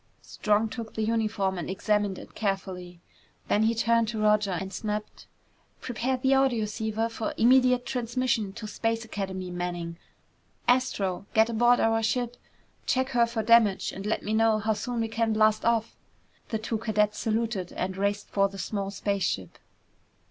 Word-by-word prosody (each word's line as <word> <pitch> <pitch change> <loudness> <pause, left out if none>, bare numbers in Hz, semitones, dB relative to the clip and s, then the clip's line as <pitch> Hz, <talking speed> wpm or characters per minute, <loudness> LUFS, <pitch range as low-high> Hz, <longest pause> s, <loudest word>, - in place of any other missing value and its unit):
Strong 210 +1 +1
took 230 -2 -7
the 220 - -1
uniform 215 -4 0
and 170 - -5
examined 205 0 0
it - - -11
carefully. 185 -4 -3 0.5
Then 210 - +3
he 225 +1 +2
turned 230 0 +2
to 220 0 -3
Roger 210 -1 +3
and 190 0 -6
snapped, 210 -1 -5 0.5
"Prepare 250 +2 -2
the 265 +1 +1
audioceiver 225 -4 +1
for 230 -1 -4
immediate 250 +1 +4
transmission 245 -3 -1
to 225 0 -7
Space 225 +2 -2
Academy, 190 -4 -4
Manning. 175 -1 -4 0.7
Astro! 200 -7 +1
Get 220 +1 +4
aboard 240 +2 +4
our 225 0 +2
ship. 240 +2 -1 0.5
Check 260 +1 +1
her 240 -2 +3
for 230 -1 -2
damage 220 -3 +4
and 195 +2 -6
let 220 - -1
me 215 - -2
know 225 0 +4
how 220 +1 0
soon 235 +2 -3
we 225 - 0
can 225 0 0
blast 215 0 +3
off!" 230 -1 +1 0.5
The 220 - -1
two 220 +1 -3
cadets 210 -2 +1
saluted 220 -5 -1
and 185 +1 -3
raced 200 +1 -1
for 195 0 +2
the 195 - -10
small 195 0 -3
spaceship. 195 - -2
220 Hz, 160 wpm, -27 LUFS, 200-230 Hz, 0.7 s, immediate